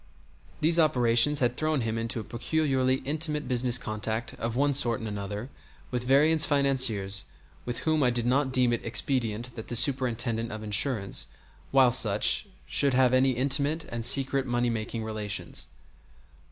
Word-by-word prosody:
These 165 +2 +3
operations 135 -1 +3
had 120 0 +1
thrown 155 -2 0
him 115 -1 -2
into 115 +1 -2
a - - -5
peculiarly 130 +2 0
intimate 150 0 -1
business 125 -1 +1
contact 110 0 -4
of 115 0 -3
one 140 +2 +2
sort 120 -4 +2
and 110 - -6
another 105 +4 -6 0.4
with 125 -1 -3
various 150 +4 +4
financiers 125 -9 +2 0.4
with 120 -1 -4
whom 155 -1 +2
I 125 - +3
did 120 -1 -2
not 130 +2 +1
deem 125 -2 +2
it 120 - -3
expedient 120 -1 -1
that 110 - -9
the 120 - -4
Superintendent 120 -3 0
of 110 0 -7
Insurance, 105 -1 -1 0.4
while 130 -2 +4
such, 110 - +2 0.2
should 140 -3 +1
have 130 -1 +3
any 130 0 +3
intimate 140 +5 +1
and 115 -1 -4
secret 135 +2 +2
money 120 0 0
making 115 0 -4
relations. 110 -2 -4
125 Hz, 155 wpm, -27 LUFS, 115-140 Hz, 0.4 s, various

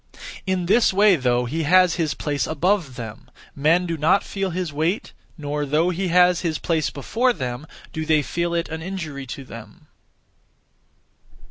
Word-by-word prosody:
In 185 -2 0
this 220 +6 +4
way 200 0 +5
though 125 -4 +1
he 155 +7 -2
has 180 +2 +4
his 160 -4 -1
place 145 -2 -2
above 160 -3 0
them, 115 -3 -8 0.3
men 165 +6 +3
do 165 -2 -3
not 160 +6 +3
feel 195 -1 -3
his 175 -3 -3
weight, 160 +8 -1 0.2
nor 150 -1 -3
though 155 +5 +1
he 185 +2 -2
has 180 0 +4
his 165 -3 -1
place 160 -3 0
before 235 - 0
them, 125 - -5 0.3
do 160 - -3
they 155 -1 +2
feel 170 +3 -2
it 170 - -1
an 160 0 -5
injury 160 -7 -6
to 135 +2 -7
them. 125 +7 -12
160 Hz, 165 wpm, -22 LUFS, 145-180 Hz, 0.3 s, way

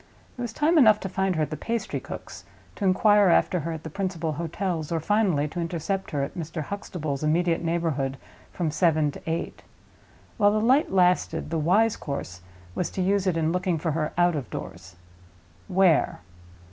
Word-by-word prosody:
There 245 - -7
was 240 - -3
time 310 +7 +3
enough 215 -5 +6
to 195 - -4
find 190 0 0
her 155 - +1
at 150 - -4
the - - -2
pastry 230 +8 -3
cook's, - - -9 0.3
to 200 - -3
inquire 205 +1 +5
after 180 +1 +3
her 165 +2 -4
at 160 -1 -6
the 160 - -6
principal 175 -3 -2
hotels, 165 +1 -3
or, 165 - 0
finally, 180 -5 +1
to 175 - -6
intercept 170 +3 -3
her 140 -2 -1
in 140 - -4
Mr. 160 -1 -5
Huxtable's 155 -6 -4
immediate 165 +2 +1
neighborhood 160 -5 -1 0.3
from 165 -4 -2
seven 155 -2 +2
to - - -11
eight. 165 +1 -3 0.8
While 205 -1 +4
the 215 - +2
light 260 +7 +3
lasted, 180 -3 +2
the 165 - 0
wise 205 +8 +3
course 95 - -6 0.3
was 180 - -2
to 190 - -4
use 195 +1 +1
it 175 -3 +1
in 160 0 +1
looking 180 -1 0
for 160 +1 -2
her 155 0 -1
out 175 -1 +3
of 140 -6 -4
doors. 90 +1 -8 0.7
Where? 185 - +3
170 Hz, 185 wpm, -25 LUFS, 155-195 Hz, 0.8 s, enough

